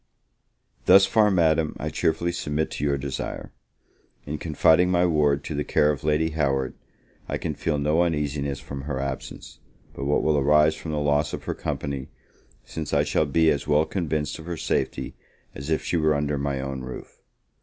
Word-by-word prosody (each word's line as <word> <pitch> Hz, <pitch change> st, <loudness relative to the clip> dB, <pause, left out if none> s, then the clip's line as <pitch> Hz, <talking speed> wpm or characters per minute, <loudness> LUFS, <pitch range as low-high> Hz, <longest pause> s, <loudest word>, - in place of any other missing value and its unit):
Thus 95 Hz, +1 st, +8 dB
far, 105 Hz, +1 st, +4 dB
Madam, 80 Hz, -4 st, +2 dB
I -, -, -2 dB
cheerfully 80 Hz, +2 st, 0 dB
submit 80 Hz, -2 st, -2 dB
to -, -, -4 dB
your 70 Hz, -1 st, +1 dB
desire. 70 Hz, -1 st, -5 dB, 0.7 s
In 75 Hz, +1 st, -4 dB
confiding 80 Hz, +3 st, +3 dB
my 90 Hz, -1 st, +3 dB
ward 75 Hz, -4 st, +2 dB
to 80 Hz, -, -5 dB
the 75 Hz, 0 st, -1 dB
care 75 Hz, +1 st, +3 dB
of 70 Hz, -, -5 dB
Lady 75 Hz, +1 st, +1 dB
Howard, 70 Hz, -4 st, 0 dB, 0.6 s
I -, -, -1 dB
can -, -, -3 dB
feel 75 Hz, +1 st, -1 dB
no 75 Hz, +3 st, +2 dB
uneasiness 75 Hz, -4 st, -1 dB
from 70 Hz, -3 st, -7 dB
her 70 Hz, -3 st, -2 dB
absence, 70 Hz, -1 st, -6 dB, 0.3 s
but 70 Hz, -, -5 dB
what 70 Hz, -, +1 dB
will 75 Hz, -2 st, +3 dB
arise 75 Hz, +2 st, +4 dB
from 80 Hz, +1 st, -8 dB
the 75 Hz, -, -2 dB
loss 75 Hz, 0 st, +1 dB
of -, -, -5 dB
her -, -, -3 dB
company, 70 Hz, -2 st, -4 dB, 0.6 s
since 80 Hz, -3 st, -4 dB
I 70 Hz, -, +4 dB
shall 75 Hz, +1 st, +1 dB
be 80 Hz, +3 st, +3 dB
as 70 Hz, -, -2 dB
well 75 Hz, +1 st, +3 dB
convinced 75 Hz, -5 st, -2 dB
of 80 Hz, -, -10 dB
her 85 Hz, -1 st, -4 dB
safety -, -, -2 dB, 0.4 s
as 70 Hz, +3 st, -7 dB
if 80 Hz, -, 0 dB
she 85 Hz, -, 0 dB
were 80 Hz, -1 st, +2 dB
under 70 Hz, 0 st, -1 dB
my 70 Hz, -1 st, -2 dB
own 65 Hz, 0 st, -4 dB
roof. 65 Hz, 0 st, -9 dB
75 Hz, 185 wpm, -25 LUFS, 70-80 Hz, 0.7 s, Thus